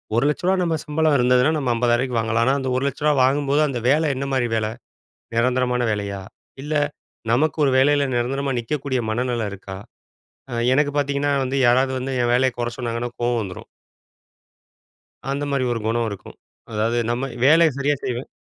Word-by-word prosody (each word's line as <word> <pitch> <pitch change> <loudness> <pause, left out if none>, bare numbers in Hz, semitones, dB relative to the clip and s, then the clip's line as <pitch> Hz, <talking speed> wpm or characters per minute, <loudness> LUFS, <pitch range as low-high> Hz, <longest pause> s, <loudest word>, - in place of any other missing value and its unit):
ரூ.1,00,000 150 +9 +1
நம்ம 170 -2 0
சம்பளருந்ததுனா 145 -4 +3
நம்ம 135 -4 -1
50,000 120 +1 +1
வாங்கலாம். 115 +1 +1
ஆனா 135 - +3
அந்த 130 -1 -3
ரூ.1,00,000 140 +3 0
வாங்கம்போது 140 +2 +2
அந்த 130 -4 -3
வேல 150 +2 +3
என்ன 140 +2 -3
மாரி 125 -2 +1
வேல? 110 -1 0 0.7
நிரந்தரமான 125 +1 +1
வேலையா? 100 -2 -3 0.4
இல்ல 150 +2 -3 0.6
நமக்கு 150 +5 +1
ஒரு 140 - +3
வேலைல 145 +2 +4
நிரந்தரமா 135 +3 -1
நிக்கக்கூடிய 130 +1 -2
மனநில 120 -1 -1
இருக்கா? 95 -1 -8 0.7
அ - - -5 0.2
எனக்கு 145 +1 +2
பாத்தீங்கனா 140 0 0
வந்து 130 +1 -2
யாராவது 130 +2 +3
வந்து 130 +1 -3
என் 120 0 +1
வேலைய 130 +1 +2
கொற 120 -1 -1
சொன்னாங்கனா, 120 0 -3
கோவம் 120 -1 +1
வந்துரும்! 95 -3 -8 1.6
அந்த 140 +1 -2
மாதிரி 135 -2 0
ஒரு 115 - -3
குணம் 115 +1 0
இருக்கும். 100 - -10 0.3
அதாவது, 110 +2 0
நம்ம 125 +3 -2 0.2
வேலைய 160 +3 +6
சரியா 145 +1 +1
செய்வோம். 125 +1 -3
130 Hz, 155 wpm, -22 LUFS, 120-140 Hz, 1.6 s, வேலைய